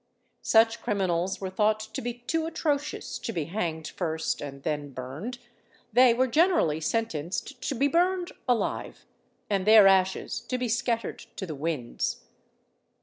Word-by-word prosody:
Such 225 Hz, +1 st, +4 dB
criminals 190 Hz, -4 st, 0 dB
were 190 Hz, -1 st, -4 dB
thought 210 Hz, +2 st, +2 dB
to 220 Hz, 0 st, -6 dB
be 240 Hz, 0 st, -3 dB
too 325 Hz, +4 st, 0 dB
atrocious 300 Hz, -3 st, -2 dB
to -, -, -4 dB
be 165 Hz, -8 st, -2 dB
hanged 165 Hz, -3 st, -3 dB
first 160 Hz, -3 st, -2 dB
and 140 Hz, -1 st, -7 dB
then 150 Hz, -2 st, -2 dB
burned: 140 Hz, -, -6 dB, 0.6 s
they 250 Hz, +1 st, +7 dB
were 250 Hz, +3 st, +3 dB
generally 295 Hz, -, +3 dB
sentenced 225 Hz, -, -2 dB
to 280 Hz, -, -1 dB
be 275 Hz, +4 st, +3 dB
burned 355 Hz, +4 st, +1 dB, 0.2 s
alive, 245 Hz, -2 st, -1 dB, 0.4 s
and 195 Hz, -1 st, -1 dB
their 215 Hz, -2 st, +9 dB
ashes 190 Hz, -1 st, +2 dB
to 255 Hz, -, -3 dB
be 250 Hz, -1 st, -2 dB
scattered 230 Hz, 0 st, -1 dB, 0.2 s
to 190 Hz, -, -4 dB
the 160 Hz, -, -5 dB
winds. 145 Hz, -4 st, -3 dB
215 Hz, 145 wpm, -27 LUFS, 165-250 Hz, 0.6 s, their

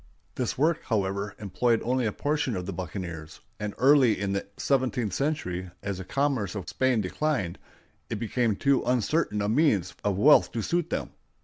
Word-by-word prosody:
This 125 Hz, -3 st, -2 dB
work, 160 Hz, +4 st, +2 dB
however, 100 Hz, -2 st, -1 dB
employed 115 Hz, +3 st, +1 dB
only 125 Hz, 0 st, +1 dB
a -, -, 0 dB
portion 145 Hz, -1 st, -1 dB
of 90 Hz, -1 st, -4 dB
the 100 Hz, -, -4 dB
buccaneers; 85 Hz, -3 st, -6 dB, 0.2 s
and 105 Hz, -1 st, -4 dB
early 130 Hz, -4 st, +5 dB
in 100 Hz, -1 st, -1 dB
the 100 Hz, -, -2 dB
seventeenth 125 Hz, -6 st, 0 dB
century, 95 Hz, -, -2 dB
as 100 Hz, -2 st, -3 dB
the -, -, -5 dB
commerce 125 Hz, -3 st, -1 dB
of 95 Hz, -4 st, -5 dB
Spain 130 Hz, -4 st, +1 dB
declined, 95 Hz, -, -1 dB, 0.5 s
it -, -, -2 dB
became 115 Hz, 0 st, 0 dB
too 140 Hz, +4 st, +2 dB
uncertain 125 Hz, -2 st, +1 dB
a -, -, 0 dB
means 110 Hz, -, +2 dB
of 100 Hz, -2 st, 0 dB
wealth 145 Hz, +8 st, +6 dB
to 115 Hz, -, -2 dB
suit 170 Hz, +4 st, 0 dB
them. -, -, -3 dB
110 Hz, 175 wpm, -27 LUFS, 100-135 Hz, 0.5 s, wealth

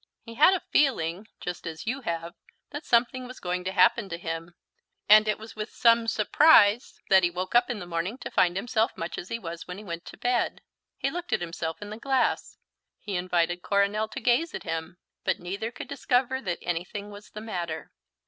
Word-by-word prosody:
He 230 Hz, -, -10 dB
had 310 Hz, +10 st, +6 dB
a 365 Hz, -, -4 dB
feeling 200 Hz, -, +1 dB
(just 180 Hz, -1 st, -5 dB
as 160 Hz, 0 st, -6 dB
you 260 Hz, +4 st, -2 dB
have) 170 Hz, -5 st, -4 dB, 0.4 s
that 290 Hz, +1 st, -7 dB
something 250 Hz, +2 st, +2 dB
was 255 Hz, -, -10 dB
going 180 Hz, 0 st, -2 dB
to 190 Hz, -, -1 dB
happen 215 Hz, +2 st, +3 dB
to 170 Hz, -, -4 dB
him; 165 Hz, 0 st, -5 dB, 0.5 s
and 215 Hz, +1 st, +8 dB
it 215 Hz, -, +1 dB
was 220 Hz, +1 st, -11 dB
with 215 Hz, 0 st, -4 dB
some 230 Hz, -1 st, +4 dB
surprise 225 Hz, -1 st, +5 dB
that 190 Hz, -1 st, +8 dB
he 175 Hz, -, +3 dB
woke 180 Hz, +2 st, -4 dB
up 240 Hz, -, +4 dB
in 245 Hz, -, -2 dB
the 180 Hz, -, -7 dB
morning 175 Hz, +6 st, -3 dB
to -, -, -6 dB
find 175 Hz, 0 st, +3 dB
himself 225 Hz, +2 st, 0 dB
much 165 Hz, +1 st, -4 dB
as 180 Hz, -, -8 dB
he 230 Hz, -, -2 dB
was 170 Hz, -6 st, -7 dB
when 180 Hz, -, -6 dB
he 210 Hz, -, -9 dB
went 170 Hz, -4 st, -6 dB
to -, -, -10 dB
bed. 245 Hz, -1 st, 0 dB, 0.4 s
He 275 Hz, -, -1 dB
looked 350 Hz, +2 st, -4 dB
at -, -, +1 dB
himself 165 Hz, +1 st, -4 dB
in 205 Hz, -, -8 dB
the 215 Hz, -, -6 dB
glass; 265 Hz, 0 st, 0 dB, 0.4 s
he 205 Hz, -2 st, -5 dB
invited 175 Hz, -1 st, 0 dB
Coronel 200 Hz, +3 st, +1 dB
to 215 Hz, -, -6 dB
gaze 255 Hz, +7 st, +1 dB
at -, -, -6 dB
him; 165 Hz, +2 st, -4 dB, 0.3 s
but -, -, +1 dB
neither 200 Hz, +6 st, -4 dB
could 250 Hz, -, -8 dB
discover 260 Hz, -1 st, 0 dB
that 180 Hz, -6 st, -2 dB
anything 180 Hz, +4 st, -4 dB
was 205 Hz, +1 st, -12 dB
the 210 Hz, -, -8 dB
matter. 170 Hz, -8 st, -5 dB
205 Hz, 210 wpm, -27 LUFS, 175-235 Hz, 0.5 s, and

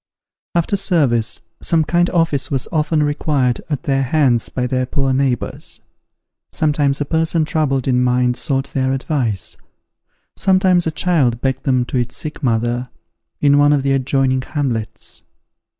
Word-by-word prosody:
After 170 Hz, +3 st, +1 dB
service, 150 Hz, -, +1 dB, 0.2 s
some 165 Hz, -2 st, +2 dB
kind 175 Hz, +3 st, +1 dB
office 165 Hz, -6 st, +1 dB
was 135 Hz, -3 st, -1 dB
often 155 Hz, -1 st, +1 dB
required 145 Hz, -4 st, 0 dB
at 145 Hz, -4 st, -2 dB
their 135 Hz, -1 st, +1 dB
hands 130 Hz, -3 st, +1 dB
by 125 Hz, -, -2 dB
their 130 Hz, 0 st, -1 dB
poor 135 Hz, -1 st, 0 dB
neighbours. 130 Hz, -2 st, -2 dB, 0.7 s
Sometimes 145 Hz, -3 st, +1 dB
a -, -, 0 dB
person 160 Hz, +1 st, +1 dB
troubled 145 Hz, -5 st, 0 dB
in 125 Hz, -1 st, +2 dB
mind 125 Hz, 0 st, +2 dB
sought 135 Hz, -1 st, -1 dB
their 130 Hz, 0 st, 0 dB
advice; 130 Hz, -, -2 dB, 0.8 s
sometimes 185 Hz, -2 st, +3 dB
a -, -, 0 dB
child 150 Hz, -9 st, +1 dB
begged 130 Hz, 0 st, -2 dB
them 130 Hz, -2 st, +2 dB
to 130 Hz, -, -3 dB
its 120 Hz, 0 st, -3 dB
sick 155 Hz, 0 st, -5 dB
mother, 120 Hz, 0 st, 0 dB, 0.5 s
in 145 Hz, 0 st, +4 dB
one 145 Hz, 0 st, +5 dB
of 140 Hz, -2 st, +1 dB
the 135 Hz, -, +1 dB
adjoining 135 Hz, 0 st, +1 dB
hamlets. 125 Hz, -7 st, -4 dB
135 Hz, 150 wpm, -18 LUFS, 125-155 Hz, 0.8 s, one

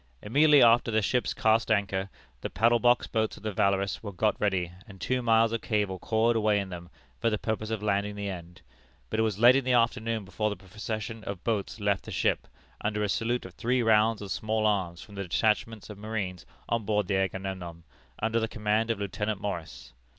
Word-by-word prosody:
Immediately 145 Hz, +6 st, +5 dB
after 115 Hz, 0 st, +5 dB
the 110 Hz, -1 st, +1 dB
ships 125 Hz, +4 st, +1 dB
cast 115 Hz, -2 st, +2 dB
anchor, 100 Hz, -2 st, 0 dB, 0.3 s
the -, -, -3 dB
paddle 115 Hz, +2 st, +3 dB
box 120 Hz, +1 st, +3 dB
boats 110 Hz, -1 st, -1 dB
of 105 Hz, -, -15 dB
the 110 Hz, -, -2 dB
Valorous 100 Hz, 0 st, +1 dB
were 105 Hz, -, -6 dB
got 105 Hz, +3 st, +1 dB
ready, 95 Hz, -4 st, 0 dB, 0.2 s
and 95 Hz, -2 st, -13 dB
two 130 Hz, +5 st, 0 dB
miles 115 Hz, -1 st, +4 dB
of 115 Hz, -1 st, -2 dB
cable 105 Hz, -4 st, -1 dB
coiled 115 Hz, +4 st, +1 dB
away 105 Hz, -2 st, +2 dB
in 100 Hz, -1 st, -4 dB
them, 85 Hz, -1 st, -8 dB, 0.3 s
for 115 Hz, -, +2 dB
the 105 Hz, -, 0 dB
purpose 110 Hz, 0 st, -3 dB
of 110 Hz, -2 st, -3 dB
landing 100 Hz, 0 st, 0 dB
the 100 Hz, 0 st, -4 dB
end; 85 Hz, -2 st, -8 dB, 0.5 s
but 110 Hz, -, -1 dB
it -, -, +4 dB
was 110 Hz, -3 st, 0 dB
late 120 Hz, +4 st, +7 dB
in 135 Hz, -, +2 dB
the 130 Hz, 0 st, +1 dB
afternoon 115 Hz, -2 st, +1 dB
before 105 Hz, +3 st, -1 dB
the 105 Hz, -, -3 dB
procession 110 Hz, +3 st, -6 dB
of 100 Hz, -3 st, -6 dB
boats 110 Hz, -1 st, -2 dB
left 100 Hz, -1 st, 0 dB
the -, -, -7 dB
ship, -, -, 0 dB, 0.4 s
under 105 Hz, 0 st, 0 dB
a -, -, +1 dB
salute 120 Hz, 0 st, -1 dB
of 95 Hz, -, -10 dB
three 120 Hz, +9 st, 0 dB
rounds 110 Hz, -1 st, +3 dB
of 100 Hz, -, -7 dB
small 110 Hz, 0 st, -1 dB
arms 90 Hz, -5 st, 0 dB
from 105 Hz, -, -15 dB
the 100 Hz, -, -5 dB
detachment 110 Hz, +3 st, 0 dB
of 105 Hz, -2 st, -10 dB
marines 100 Hz, -5 st, -4 dB, 0.2 s
on 115 Hz, -1 st, 0 dB
board 105 Hz, -1 st, +1 dB
the 95 Hz, -, +1 dB
Agamemnon, 95 Hz, -3 st, -3 dB, 0.3 s
under 110 Hz, +1 st, 0 dB
the 110 Hz, -, 0 dB
command 110 Hz, 0 st, 0 dB
of 115 Hz, -, 0 dB
Lieutenant 105 Hz, +1 st, -2 dB
Morris. 90 Hz, -6 st, -6 dB
105 Hz, 210 wpm, -28 LUFS, 100-115 Hz, 0.5 s, late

